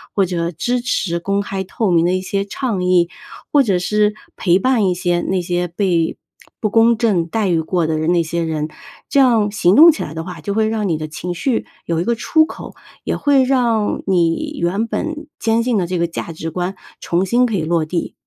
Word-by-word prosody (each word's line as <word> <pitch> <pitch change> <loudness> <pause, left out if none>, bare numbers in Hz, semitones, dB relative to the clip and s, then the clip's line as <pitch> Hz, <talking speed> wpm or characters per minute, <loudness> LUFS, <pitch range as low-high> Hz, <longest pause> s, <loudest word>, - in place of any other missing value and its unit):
或 195 - +3
者 170 -1 -2
支 240 +9 -1
持 170 -7 -1
公 200 +3 -1
开 195 -1 -4
透 195 +1 -1
明 165 -1 +4
的 175 +1 +2
一 185 - -1
些 195 +1 -1
倡 205 -3 -3
议。 180 -1 +3 0.4
或 290 - +6
者 200 -8 +1
是 210 +3 +1 0.2
陪 180 -1 +3
伴 225 -1 +2
一 180 - +1
些 175 -1 0
那 185 +1 -1
些 175 0 -1
被 170 -2 0 0.5
不 215 - +1
公 230 +2 +4
正 210 -7 +1
待 215 +4 -1
遇 170 -2 +2
过 170 +1 0
的 160 -1 0
人 155 +2 0
那 170 -1 +2
些 170 +1 -2
人。 155 -1 -2 0.4
这 280 - +2
样 230 -6 +4
行 195 -2 +3
动 330 +3 +9
起 310 - -5
来 150 - -7
的 160 0 -5
话， 180 +1 -8
就 200 - -3
会 220 +1 +1
让 220 -2 -1
你 165 -4 0
的 155 0 -5
情 175 +4 -5
绪 230 +7 -1 0.2
有 165 -1 -1
一 - - 0
个 235 - +1
出 315 +7 +3
口， - - -10 0.3
也 - - -1
会 280 -2 +3
让 240 -5 +1
你 190 - 0
原 195 +6 0
本 310 +5 -4
坚 225 0 +1
信 240 -2 +1
的 185 - +1
这 180 +1 -2
个 170 0 +1
价 170 0 -6
值 165 0 -5
观， 180 +2 -3 0.3
重 175 +2 0
新 240 +6 +3
可 225 -4 -1
以 185 - 0
落 165 0 +1
地。 170 +2 -3
190 Hz, 245 characters per minute, -18 LUFS, 170-225 Hz, 0.5 s, 动